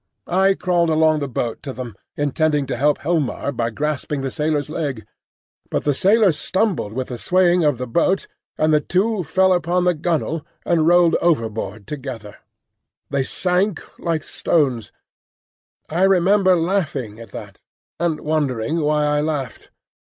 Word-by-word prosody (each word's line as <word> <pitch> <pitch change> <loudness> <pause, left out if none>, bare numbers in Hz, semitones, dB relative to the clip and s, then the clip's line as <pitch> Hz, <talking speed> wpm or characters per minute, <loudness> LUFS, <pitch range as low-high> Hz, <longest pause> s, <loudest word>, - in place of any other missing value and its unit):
I 190 +2 +3
crawled 175 -3 +1
along 155 -1 +3
the 140 - -2
boat 120 -2 -3
to 135 - -6
them, 125 -5 -7 0.2
intending 145 0 +1
to - - -3
help 145 +4 +2
Helmar 150 -3 -1
by 115 -3 -1
grasping 150 +2 -3
the 135 -1 -3
sailor's 150 -1 -1
leg; 145 -8 -4 0.6
but - - -1
the 145 - +2
sailor 200 - +4
stumbled 180 - -1
with 130 +3 -4
the 125 -2 -6
swaying 180 +1 +3
of 145 -4 +2
the 125 - -4
boat, 170 +10 +1 0.3
and 155 0 +2
the 150 - +5
two 195 +4 0
fell 190 +4 +3
upon 175 0 +1
the 180 0 +3
gunwale 165 -1 -1 0.2
and 165 -2 +2
rolled 175 -1 +5
overboard 110 - -1
together. 130 -8 -7 0.7
They 140 -1 +1
sank 180 +5 0 0.2
like 165 -3 -1
stones. 130 -9 0 1.0
I 170 +4 -2
remember 190 0 +4
laughing 160 - -1
at 115 -2 -10
that, - - -10 0.4
and 170 -3 -1
wondering 150 -1 -1
why 150 0 +1
I 150 0 +1
laughed. 145 -7 -4
155 Hz, 150 wpm, -21 LUFS, 135-175 Hz, 1.0 s, the